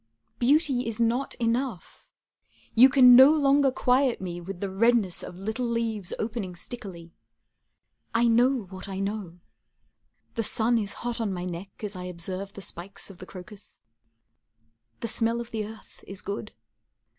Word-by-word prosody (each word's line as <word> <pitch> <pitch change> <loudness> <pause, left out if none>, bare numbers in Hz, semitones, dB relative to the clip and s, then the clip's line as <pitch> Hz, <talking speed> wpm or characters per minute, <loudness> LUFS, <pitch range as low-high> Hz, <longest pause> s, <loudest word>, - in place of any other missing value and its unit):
Beauty 270 -1 +2
is 230 -1 -3
not 235 +4 0
enough. 235 -3 -3 0.7
You 250 +4 +8
can 255 -2 +8
no 265 +3 +9
longer 280 -1 +4
quiet 255 0 +2
me 175 -2 -5
with 180 +1 -7
the 200 - -2
redness 205 -1 +2
Of - - -8
little 220 +6 -3
leaves 225 -5 -2
opening 215 -5 -4
stickily. 175 -4 -9 1.0
I 235 +1 +3
know 245 +2 +3
what 190 +1 -10
I 190 - -5
know. 195 -4 -4 0.9
The 230 - -1
sun 225 +2 +2
is 205 -2 -3
hot 240 -1 -2
on 215 -3 -1
my 180 -1 -4
neck 185 +4 -8
as 205 -1 -4
I 180 0 -6
observe 185 +3 -3
The 200 - -7
spikes 190 +3 -4
of 185 - -16
the 185 - -10
crocus. 190 +2 -12 1.2
The - - -2
smell 230 +1 +1
of 235 0 -7
the 215 -2 -3
earth 220 0 -14
is 195 -1 -6
good. 205 +1 -5
220 Hz, 155 wpm, -26 LUFS, 190-240 Hz, 1.2 s, no